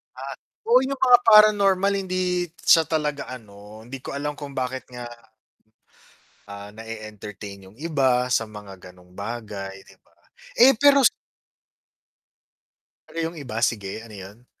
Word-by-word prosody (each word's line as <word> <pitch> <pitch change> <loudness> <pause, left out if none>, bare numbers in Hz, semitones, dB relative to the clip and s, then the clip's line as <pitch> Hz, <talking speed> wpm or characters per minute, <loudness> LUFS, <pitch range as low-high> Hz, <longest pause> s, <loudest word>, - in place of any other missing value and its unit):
Ah, 135 +1 -7 0.3
oo 245 +2 +6
yung 270 0 -3
mga 250 -2 +7
paranormal 200 -3 +5
hindi 185 -2 -1
siya 165 0 +5
talaga 150 -4 -3
ano, 105 -2 -12
hindi 130 0 -9
ko - - -6
alam 145 +1 -4
kung 145 -1 -8
bakit 130 0 -3
nga 125 -1 -7 1.4
ah, 100 0 -9
na 110 - -10
e-entertain 105 -3 -9
yung 105 - -21
iba 135 -5 +1
sa 115 -3 0
mga 100 -3 -11
ganong 90 0 -21
bagay 100 -2 -6
'di - - -18
ba? - - -33 0.4
Eh 265 +3 +8
pero 280 0 +5 2.0
Ano - - -12
'yong 165 0 -4
iba, 125 -5 -7
sige 105 -1 -4
ano 110 - -13
'yon? 105 +5 -12
125 Hz, 140 wpm, -23 LUFS, -, 2.0 s, Eh